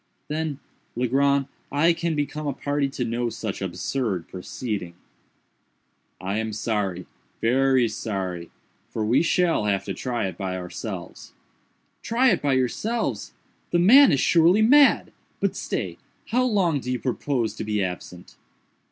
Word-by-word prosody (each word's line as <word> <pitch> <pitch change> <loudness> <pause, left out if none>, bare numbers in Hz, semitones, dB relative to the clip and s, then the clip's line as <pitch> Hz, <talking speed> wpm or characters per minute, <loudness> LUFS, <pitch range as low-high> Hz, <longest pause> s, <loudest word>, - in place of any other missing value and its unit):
"Then, 155 -2 -2 0.4
Legrand, 135 +3 +2 0.3
I 165 +4 +4
can 165 -1 -2
become 150 +1 -3
a 140 - 0
party 145 +1 -1
to 130 -2 -3
no 120 +1 -1
such 110 -3 -5
absurd 95 +1 -2
proceeding." 95 -1 -5 1.2
"I 100 +3 -2
am 110 -1 -3
sorry—very 115 +5 0
sorry—for 95 0 -5
we 120 +5 +3
shall 170 -7 +2
have 100 -2 0
to 100 - -3
try 120 +4 -2
it 95 -1 -5
by 95 -2 -2
ourselves." 90 -1 -7 0.7
"Try 245 +2 +3
it - - +1
by 140 -2 +1
yourselves! 130 - -1 0.4
The 175 - +2
man 245 +10 +7
is 140 - +2
surely 175 +8 +4
mad!—but 280 +5 +3
stay!—how 250 +3 -3
long 185 - +2
do 125 -1 -4
you 125 - 0
propose 125 -2 -1
to - - -5
be 105 -1 0
absent?" 90 -1 -7
125 Hz, 130 wpm, -24 LUFS, 105-155 Hz, 1.2 s, man